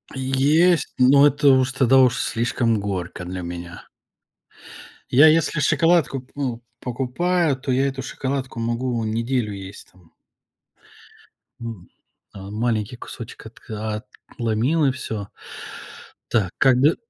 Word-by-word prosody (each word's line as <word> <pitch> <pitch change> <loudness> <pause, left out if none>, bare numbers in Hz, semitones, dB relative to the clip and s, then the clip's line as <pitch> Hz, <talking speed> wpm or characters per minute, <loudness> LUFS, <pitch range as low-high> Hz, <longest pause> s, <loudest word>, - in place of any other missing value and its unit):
Есть, 140 +6 +2
но 140 +3 +6
это 145 0 +3
уж, 130 -1 +4
тогда 130 0 +4
уж, 125 -2 +4
слишком 115 -1 0
горько 95 -3 -4
для 90 +1 -5
меня. 85 0 -8 1.2
Я 140 +5 +7
если 160 0 +3
шоколадку, 165 -3 +2
п 130 - -26
ну, 130 -5 -3 0.2
покупаю, 140 +7 0
то 130 +1 -4
я 135 +2 +2
эту 135 -1 -4
шоколадку 130 -2 -4
могу 120 +1 -1
неделю 115 +1 -1
есть 95 0 -10
там. 90 -2 -24 1.5
М. 115 -6 -8 0.4
Э, - - -10
маленький 110 +3 -2
кусочек 120 -1 -10
отка 110 0 -6 0.3
отломил 120 +8 +1
и 135 - +3
всё. 110 -6 -6 1.0
Так, 100 -6 +1
когд 135 +4 +4
125 Hz, 120 wpm, -22 LUFS, 110-135 Hz, 1.5 s, Я